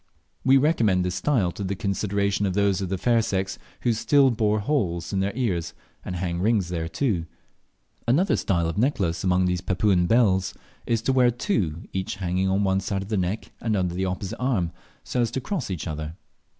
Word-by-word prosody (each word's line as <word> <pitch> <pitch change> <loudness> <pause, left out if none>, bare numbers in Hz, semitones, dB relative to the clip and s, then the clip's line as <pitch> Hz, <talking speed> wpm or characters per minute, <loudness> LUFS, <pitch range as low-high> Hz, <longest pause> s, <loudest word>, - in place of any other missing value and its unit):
We 135 +1 +6
recommend 115 - +2
this 90 - -1
style 100 -4 +1
to 100 - -6
the 100 +1 -2
consideration 100 0 0
of 90 - -2
those 100 -2 +2
of 95 - -3
the 95 - -1
fair 115 +4 +3
sex 95 -3 -2 0.2
who 120 - +2
still 135 +4 +4
bore 110 -2 +1
holes 100 - -1
in 95 - +1
their 95 +1 0
ears 90 -10 -1 0.3
and 90 - -5
hang 85 -1 -2
rings 105 -4 +2
thereto. 85 +3 -1 0.8
Another 165 +11 +3
style 85 -3 0
of 80 +4 -2
necklace 95 - 0
among 90 0 +3
these 90 -1 0
Papuan 95 -1 +2
belles 100 -5 +3 0.3
is 115 -1 +1
to 135 - +2
wear 125 -2 +5
two, 100 - -1
each 95 +1 -2
hanging 95 0 0
on 95 +2 +2
one 95 -1 +2
side 95 0 -2
of 100 - -11
the 110 - 0
neck 95 +3 -2
and 110 -2 0
under 90 -3 0
the 95 +2 -1
opposite 95 +1 -4
arm, 115 -10 0 0.3
so 125 - -1
as 115 - +1
to 130 - -3
cross 140 - -3
each 90 -5 -4
other. 80 0 -5
95 Hz, 200 wpm, -25 LUFS, 90-115 Hz, 0.8 s, We